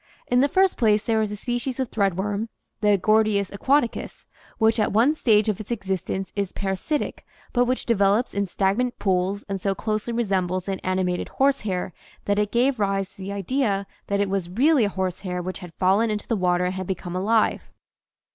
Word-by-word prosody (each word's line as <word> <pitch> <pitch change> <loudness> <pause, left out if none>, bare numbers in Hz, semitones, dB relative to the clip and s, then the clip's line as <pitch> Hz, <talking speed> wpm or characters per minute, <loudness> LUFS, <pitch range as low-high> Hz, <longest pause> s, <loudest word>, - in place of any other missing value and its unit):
In 245 - +2
the 275 - +4
first 380 +5 +2
place 215 -2 +3
there 220 0 +1
is 215 -1 -1
a - - -3
species 245 +4 -3
of 260 -3 -2
threadworm 200 +1 0 0.3
(the 210 -1 +4
Gor 215 +4 +4
dius 200 -2 -1
aquaticus) 260 +4 0 0.3
which 225 0 +3
at 210 - +2
one 235 +8 +4
stage 220 -8 +3
of 210 -3 0
its 210 - -11
existence 190 -3 -3
is 200 -2 -1
para 195 -1 -2
sitic 295 - -2 0.3
but 245 0 +3
which 255 +1 -1
develops 210 +1 +2
in 200 0 -1
stagnant 200 +7 0
pools 190 +1 0
and 195 -2 -4
so 195 0 0
closely 215 +2 -2
resembles 190 -5 -1
an 195 -1 -2
animated 185 -1 -1
horsehair 215 -11 0 0.3
that 205 0 +1
it 210 -1 0
gave 250 +1 +2
rise 195 -1 0
to - - -31
the 195 0 -6
idea 200 0 -1 0.2
that 200 0 0
it 200 - +2
was 190 -3 -1
really 260 - +3
a - - 0
horsehair 185 -1 -3
which 185 +1 -5
had 180 -3 -9
fallen 200 +5 +3
into 210 -1 -3
the 230 - +1
water 180 -2 +1
and 180 - -1
had 185 -1 -5
become 180 -1 -4
alive. 215 +4 +1
205 Hz, 195 wpm, -24 LUFS, 190-230 Hz, 0.3 s, the